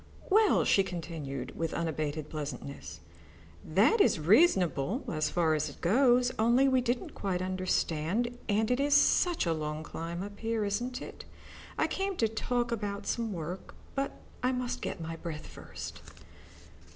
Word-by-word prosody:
"Well," 430 +2 +5
she 195 - +5
continued, 155 -8 -5
with 165 -1 -2
unabated 155 -2 -2
pleasantness, 145 -2 -6 0.6
"that 450 -1 +4
is 400 - +4
reasonable 190 - +3
as 155 -1 0
far 165 -3 +2
as 155 0 0
it 140 - -13
goes, 245 +5 +4
only 240 +5 +4
we 260 -1 +3
didn't 245 0 -2
quite 190 -3 -2
understand, 185 +4 -1
and 215 +3 +2
it 250 - +2
is 285 0 +3
such 340 - +4
a 165 - +2 0.3
climb 170 +3 -5
up 205 0 -9
here, 225 -1 -1
isn't 240 +5 -2
it? - - -10 0.5
I - - +3
came 390 0 -2
to 225 - +2
talk 240 +2 -1
about 205 -2 -3
some 230 -2 -1
work, 175 +1 -6 0.2
but 275 0 -2 0.3
I 255 - +2
must 250 -1 -2
get - - -4
my 165 0 -5
breath 160 -2 -6
first." - - -9
200 Hz, 150 wpm, -30 LUFS, 165-245 Hz, 0.6 s, Well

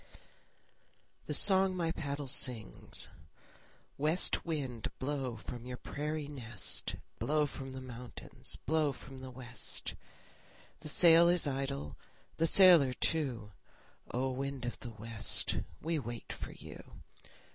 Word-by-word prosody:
THE 150 - +1
SONG 190 +1 +6
MY 165 -2 0
PADDLE 145 -3 -4
SINGS 125 - 0 0.9
West 155 +5 +3
wind, 135 -9 -3
blow 135 -3 -3
from 120 +2 -8
your 125 0 -5
prairie 150 +2 -4
nest, 120 - -5 0.2
Blow 150 0 +1
from 135 -2 -7
the 130 - -7
mountains, 125 -1 -6
blow 155 -2 +1
from 135 +1 -12
the 130 - -7
west. 125 -4 -6 0.9
The 155 0 -2
sail 170 +2 +7
is 175 -2 +4
idle, 135 - -3 0.4
the 165 - +3
sailor 170 -7 +8
too; 125 -8 -1 0.6
O! 130 +2 -1
wind 135 -1 -4
of 120 - -4
the 120 - -7
west, 115 0 +1 0.2
we 165 0 -1
wait 120 -3 -6
for - - -7
you. - - -12
135 Hz, 125 wpm, -33 LUFS, 125-155 Hz, 0.9 s, sailor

